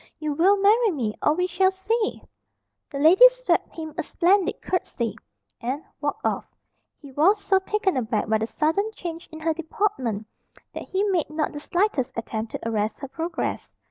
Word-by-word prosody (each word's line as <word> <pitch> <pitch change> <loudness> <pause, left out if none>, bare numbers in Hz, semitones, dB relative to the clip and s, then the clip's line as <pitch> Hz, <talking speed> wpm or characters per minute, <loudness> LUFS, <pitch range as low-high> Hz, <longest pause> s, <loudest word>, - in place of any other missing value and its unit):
You 305 -1 -2
will 375 +7 +4
marry 430 +4 +4
me, 245 - -2
or 300 - +3
we 360 +2 +1
shall 370 +1 +2
see!" 425 +4 -2 0.7
The 280 - -6
lady 360 - +8
swept - - -1
him 315 -2 -6
a - - +3
splendid 360 +4 +2
curtsey, 235 - -2 0.5
and 265 +6 -3 0.2
walked - - -3
off. - - -1 0.5
He 285 -2 -13
was 330 +10 +4
so 390 -1 +2
taken 385 -1 0
aback 225 -4 -1
by 220 0 +2
the 220 - -1
sudden 325 - 0
change 335 -1 -7
in 315 - -9
her 325 0 +1
deportment 320 - -2 0.5
that - - -6
he 385 +1 0
made 370 -6 0
not 305 0 -1
the 295 - -5
slightest 345 - -1
attempt 225 -1 -4
to - - -4
arrest 215 -1 -1
her 275 - -5
progress. 325 +4 -4
325 Hz, 175 wpm, -24 LUFS, 270-390 Hz, 0.7 s, lady